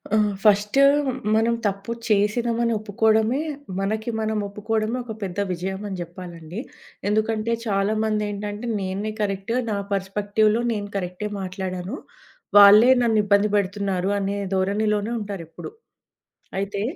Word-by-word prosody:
ఆ! - - +4 0.3
ఫస్టు 210 +5 +4 0.5
మనం 225 +2 +3
తప్పు 200 +2 -2 0.2
చేసినామని 230 +3 +1
ఒప్పుకోవడమే 220 +4 +2 0.4
మనకి 215 +3 -2
మనం 220 0 -1
ఒప్పుకోవడమే 215 +3 -2
ఒక 230 -2 -6
పెద్ద 190 0 -4
విజయమని 190 +2 -4
జేప్పాలండి. 175 0 -8 0.5
ఎందుకంటే 220 +1 0
చాలా 200 0 +1
మంది 215 -1 0
ఏంటంటే, 205 +3 -5
నేనే 195 +3 -3
కరెక్టు 200 +2 -2
నా 205 - -1
పెర్స్పెక్టివ్‌లో 205 +3 +1
నేను 205 -2 -3
కరెక్టే 185 +2 -3
మాట్లాడాను. 185 0 -4 0.6
వాళ్ళే 205 +4 +9
నన్ను 225 -2 +3
ఇబ్బంది 205 +1 +3
పెడుతున్నారు 195 -1 -1
అనే 200 +1 -2 0.2
ధోరణిలోనే 205 +3 0
ఉంటారెప్పుడు. 195 - -7 0.9
అయితే 200 0 -3
205 Hz, 115 wpm, -23 LUFS, 195-220 Hz, 0.9 s, వాళ్ళే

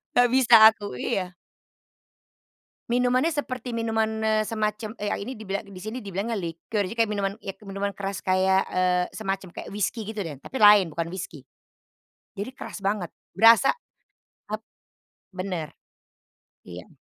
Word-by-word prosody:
Gak 245 -1 +5
bisa 255 -2 +6 0.2
aku 205 - -8
iya. 185 +8 -1 1.6
Minumannya 250 +6 +2
seperti 255 -4 -4
minuman, 220 -1 -1
eee, 215 0 +2
semacam, 215 0 -2
eee, 205 - -1
a - - -1
ini 230 +6 -5
dibila 215 -3 -5
di 200 - -14
sini 215 +3 -6
dibilangnya 200 +4 -2
liquor, 185 +4 -3
jadi 185 - -5
kayak 225 - +2
minuman 200 -2 -1
ya 195 - -7
minuman 195 +1 -2
keras 195 0 -4
kayak, 190 0 +3
eee, 180 -1 +2
semacam 195 -3 -4
kayak - - -8
whiskey 210 +2 -2
gitu 215 0 -4
deh, 160 -6 -6
tapi 205 - -7
lain, 205 -6 +7
bukan 165 +1 -3
whiskey. 170 -5 -7 0.9
Jadi 205 +5 -5
keras - - -8
banget 195 -3 -2 0.2
berasa 230 - +6 0.8
ap 215 - -2 0.7
benar. 185 -4 -4 0.9
Iya. 90 0 -10
205 Hz, 145 wpm, -25 LUFS, 190-225 Hz, 1.6 s, lain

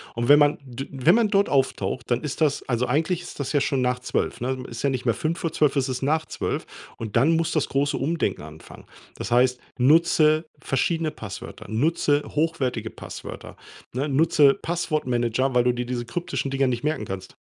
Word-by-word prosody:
und 120 +2 -2
wenn 145 +1 +8
man 145 0 +4
d 130 +1 -7
wenn 140 +6 +3
man 230 -1 +4
dort 200 0 +3
auftaucht, 130 -2 -1
dann 120 0 +1
ist 150 +2 -5
das 145 -2 +2
also, 125 0 0
eigentlich 160 +6 0
ist 175 - -10
das 140 +2 -3
ja 145 - +3
schon 135 -2 0
nach 125 0 0
12:00 125 - -2
ne? 130 +1 -1
Es 115 - -9
ist - - -5
ja 140 - +3
nicht 130 -1 -3
mehr 115 - +3
23:55, 155 0 0
es 135 -1 +1
ist 130 - -3
nach 155 +3 +1
12:00. - - -3 0.3
Und 110 -3 -6
dann 140 +7 +4
muss 165 +1 0
das 155 - 0
große 140 +1 0
Umdenken 145 - -1
anfangen. 80 +1 -12 0.3
Das - - -5
heißt, 125 +1 +3 0.2
nutze 155 +3 +4
verschiedene 155 +4 0
Passwörter, 100 -2 -9
nutze 145 +4 +1
hochwertige 135 -8 -1
Passwörter, - - -9 0.4
ne, 140 +4 -1
nutze 145 -1 +4
Passwortmanager, 130 -7 -1
weil 125 -1 +4
du 125 - +3
dir 120 0 -3
diese 120 -1 -3
kryptischen 170 +1 -3
Dinger 135 -1 +2
nicht 120 0 -2
merken 155 +1 -1
kannst. 95 -1 -7
135 Hz, 195 wpm, -24 LUFS, 125-155 Hz, 0.4 s, wenn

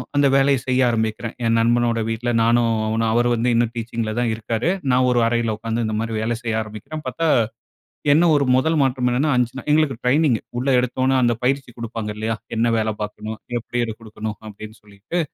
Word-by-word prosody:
அந்த 145 0 +4
வேலைய 135 0 +4
செய்ய 130 0 +1
ஆரம்பிக்கிறேன். 110 0 -2
என் 115 0 +3
நண்பனோட 120 0 +2
வீட்ல 115 +2 -2
நானும், 115 0 +3 0.2
அவனும் 110 +1 0
அவரு 120 +1 +3
வந்து 120 +1 +1
இன்னும் 115 0 +2
டீச்சிங்ல 115 -1 -3
தான் 120 -2 +1
இருக்காரு. 115 +6 -2 0.2
நா 125 - +4
ஒரு 120 -1 +2
அறையில 115 -1 0
உட்காந்து 115 +1 -2
இந்த 110 - -2
மாரி 115 0 -3
வேலை 115 +1 -1
செய்ய 115 -2 -2
ஆரம்பிக்கிறேன் 110 +9 -8
பாத்தா, 165 +6 -1 0.9
என்ன 165 +4 +4
ஒரு 140 -1 +2
மொதல் 160 +5 +2
மாற்றம் 125 -1 +1
என்னன்னா, 145 +5 +1
5 120 -1 +1
நா - - -10
எங்களுக்கு 150 -6 +2
ட்ரெய்னிங். 130 -2 +3 0.2
உள்ள 135 +2 -1
எடுத்த 125 +1 -1
உடனே 135 0 +3
அந்த 120 -1 +2
பயிற்சி 135 0 0
குடுப்பாங்க 115 -2 -4
இல்லையா? 110 +1 -1 0.2
"என்ன 115 +1 +2
வேலை 110 0 0
பாக்கணும்? 110 +1 -5 0.2
எப்படி 120 +1 -3
அத 110 - -5
குடுக்கணும்?" 110 -1 -6
அப்படீன்னு 110 +1 -10
சொல்லிட்டு. 105 - -5
115 Hz, 190 wpm, -21 LUFS, 110-125 Hz, 0.9 s, அந்த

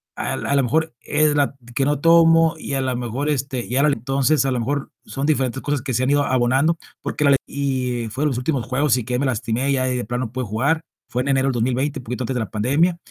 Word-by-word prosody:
A - - -3
a - - -3 0.2
la 140 - +3
mejor 160 +5 0
es 150 0 +2
la 140 -1 +1 0.2
que 135 0 +2
no 145 0 +1
tomo 165 0 +5
y 155 - -6
a 135 - 0
la 130 -1 -1
mejor, 125 +4 -3
este, 135 -3 -2
y 125 - -4
ahora 140 +3 +4
entonces, 135 +4 +1
a 135 - +1
lo 125 - 0
mejor 140 +4 -2 0.2
son 135 +1 -4
diferentes 135 -4 0
cosas 145 -2 -1
que 130 0 -4
se 125 +2 +1
han 130 - +1
ido 145 0 +3
abonando, 130 +5 +2 0.2
porque - - -2
la 140 -1 +6
y 130 -4 -2
fueron 140 +8 0
los 130 - -2
últimos 125 -2 -1
juegos 130 +1 +1
y 125 - -2
que 125 +1 -1
me 140 - 0
lastimé 125 +2 -1
ya 130 -1 +1
y - - -1
de 120 - -3
plano 120 +3 -2
no 110 - -8
pude 130 0 -3
jugar. 135 +10 0 0.3
Fue 125 - -1
en 135 - -3
enero 135 0 +2
del 135 - +1
2020 130 +5 -1
un - - -11
poquito 125 +1 -4
antes 125 - -2
de - - 0
la 110 - -4
pandemia. 145 +11 +1
135 Hz, 260 wpm, -21 LUFS, 125-145 Hz, 0.3 s, la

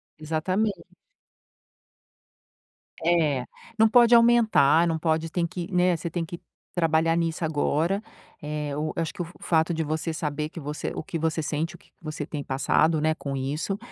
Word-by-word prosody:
exatamen 170 +7 0 2.3
É, 155 -6 +2 0.3
não 220 - +6
pode 240 +1 +6
aumentar, 220 -10 +5
não 165 -1 0
pode 160 0 0
tem 170 0 0
que, 175 +1 -6
né 180 -1 +3
você 170 - -4
tem 175 -2 -2
que 170 +1 -8 0.3
trabalhar 165 -1 +2
nisso 165 0 -1
agora, 160 +5 0 0.4
eh, 150 -1 -3
o 155 +1 -2
eu 165 - -1
acho 160 - -3
que - - -3
o - - -4
f 170 - -12
f - - -10
fato 160 0 +3
de 160 -1 -1
você 160 +2 -2
saber 150 -1 -3
que 165 - -8
você 150 +1 -4
o - - -4
que 165 +1 -4
você 160 0 -1
sente, 155 +2 -2
o - - -12
que - - -25
que - - -54
você 155 -2 -5
tem 145 -3 -5
passado, 150 +4 +2
né, 155 +1 +2
com 140 -3 -5
isso, 150 +9 -2
160 Hz, 185 wpm, -26 LUFS, 155-175 Hz, 2.3 s, não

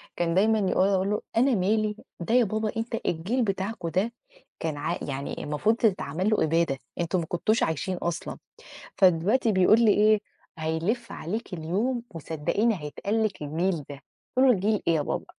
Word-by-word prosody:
كان 170 -1 0
دايمًا 215 +4 +3
يقول 190 -1 +2
أقول 190 0 +1
له: 210 - 0 0.2
"أنا 255 +1 +4
مالي، 210 +2 +1 0.2
ده 175 +6 -2
يا 250 - +6
بابا 215 +1 -1
أنت 225 +1 -2
الجيل 200 +10 0
بتاعكم 195 -2 -2
ده 195 +8 0 0.5
كان 160 -2 -3
عا 165 +4 -2
يعني 140 -1 -4
المفروض 150 +10 +1
تتعمل 190 -4 0
له 215 - +2
إبادة، 165 -3 +1 0.2
أنتم 175 +2 0
ما 165 - -3
كنتوش 215 +8 +1
عايشين 165 +4 -1
أصلًا." 170 -1 -4 0.6
فدلوقتي 195 +6 +3
بيقول 190 +4 +5
لي 210 - +6
إيه: 215 0 +4 0.4
"هيلِف 170 +10 -2
عليكِ 210 +4 -5
اليوم 205 +10 -1
وصدّقيني 165 +8 0
هيتقال 205 +9 -1
لِك 200 -7 -2
الجيل 160 +2 -1
ده."، 140 0 -9 0.4
قُلت 265 +1 +6
له: 250 - +7
"جيل 205 +2 0
إيه 165 - +4
يا 150 - +1
بابا؟" - - -3
190 Hz, 170 wpm, -26 LUFS, 165-220 Hz, 0.6 s, له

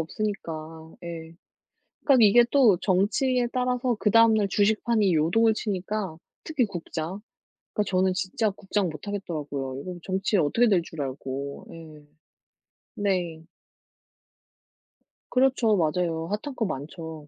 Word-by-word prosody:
없으니까. 160 -4 -5
예. 165 -1 -7 0.7
그러니까 260 -6 +6
이게 225 +4 +7
또 240 -10 +5
정치에 240 +6 +1
따라서 250 -1 0
그 210 - +1
다음날 220 -2 +5
주식판이 215 -1 +2
요동을 195 +9 +3
치니까 200 -3 -3 0.3
특히 300 -6 0
국장. 175 -1 -5 0.5
그러니까 210 -2 -1
저는 185 0 +2
진짜 185 +4 -1
국장 195 0 -2
못 155 +5 -10
하겠더라고요. 145 -9 -4
이거 180 +2 -6
정치에 195 +2 0
어떻게 205 +10 +3
될 190 -5 +3
줄 160 -1 -9
알고. 135 +1 -5
예. 155 -3 -12 0.9
네. 180 -7 -1 1.9
그렇죠. 250 -4 +3
맞아요. 165 0 0
핫한 215 - -4
거 225 - 0
많죠. 160 -1 -7
190 Hz, 270 characters per minute, -26 LUFS, 160-220 Hz, 1.9 s, 이게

